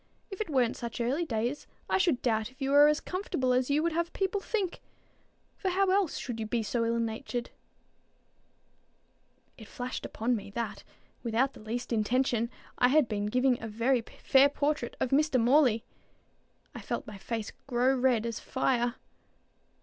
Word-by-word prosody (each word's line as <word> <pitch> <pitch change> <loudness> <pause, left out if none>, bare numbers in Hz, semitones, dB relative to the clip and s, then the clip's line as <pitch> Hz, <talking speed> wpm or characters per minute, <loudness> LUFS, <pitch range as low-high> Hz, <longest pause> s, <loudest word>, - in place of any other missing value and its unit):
If 390 - -5
it 425 - -3
weren't 255 -5 +2
such 235 -2 -6
early 265 +8 0
days, 240 +1 -2 0.2
I - - +2
should 340 -9 +2
doubt 220 -2 +1
if 260 - -23
you 270 0 -1
were 290 +1 +8
as 300 0 +3
comfortable 350 -9 -1
as 255 +1 +1
you 295 +2 +2
would 335 - +1
have 340 +1 -1
people 390 +1 -1
think; 390 -6 -2 0.8
for 380 - 0
how 380 +1 +2
else 390 -4 +1
should 240 -3 -5
you 220 - -3
be 230 +1 0
so 230 +2 -1
ill 230 0 +1
natured?" 235 +2 -3 2.1
It 220 - -11
flashed 250 +2 -5
upon 240 +3 -1
me, 205 - -6
that, 215 -4 -3 0.4
without 240 +4 +1
the - - -13
least 235 +3 -4
intention, 235 +1 +1 0.3
I 250 - +6
had 285 0 +4
been 205 -1 -2
giving 250 +2 +2
a 225 - -4
very 230 +4 +1 0.2
fair 275 +1 +6
portrait 285 -3 -1
of 250 - -1
Mr. 290 -1 +3
Morley. 240 -2 +4 0.9
I - - -7
felt - - -3
my 210 -2 -9
face 225 +1 -4 0.2
grow 255 +1 +2
as 255 - -3
red 245 -4 +3
as 230 -2 -3
fire. 245 -2 0
250 Hz, 175 wpm, -30 LUFS, 230-290 Hz, 2.1 s, were